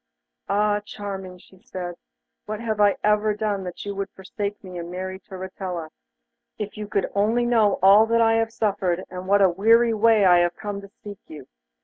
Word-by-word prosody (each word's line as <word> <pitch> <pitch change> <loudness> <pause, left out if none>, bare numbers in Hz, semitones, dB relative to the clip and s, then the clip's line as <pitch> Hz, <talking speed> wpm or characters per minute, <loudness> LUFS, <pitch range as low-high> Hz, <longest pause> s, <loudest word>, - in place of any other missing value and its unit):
'Ah, 205 +1 +2
Charming!' 195 -3 -7
she 185 +1 -20
said, 180 -1 -6 0.5
'what 215 0 -4
have 220 -2 -3
I 205 -1 +4
ever 210 0 +2
done 210 -2 -2
that 180 +2 -7
you 200 -1 -4
should 195 0 -3
forsake 200 +2 -5
me 180 -2 -8
and 170 0 -7
marry 185 +1 -5
Turritella? 185 -3 -6 0.7
If 210 -1 -5
you 210 -1 -6
could 200 -2 0
only 220 +4 +2
know 225 -4 +3
all 210 +4 +6
I 225 -1 +4
have 225 0 0
suffered, 195 -6 -1
and 185 0 -7
what 200 +1 +4
a 190 - +6
weary 225 +6 +4
way 220 -1 +4
I 175 -1 +6
have 175 0 +1
come 205 -1 -5
to 200 - -13
seek 205 -2 -9
you. 150 -4 -10
200 Hz, 190 wpm, -23 LUFS, 185-215 Hz, 0.7 s, all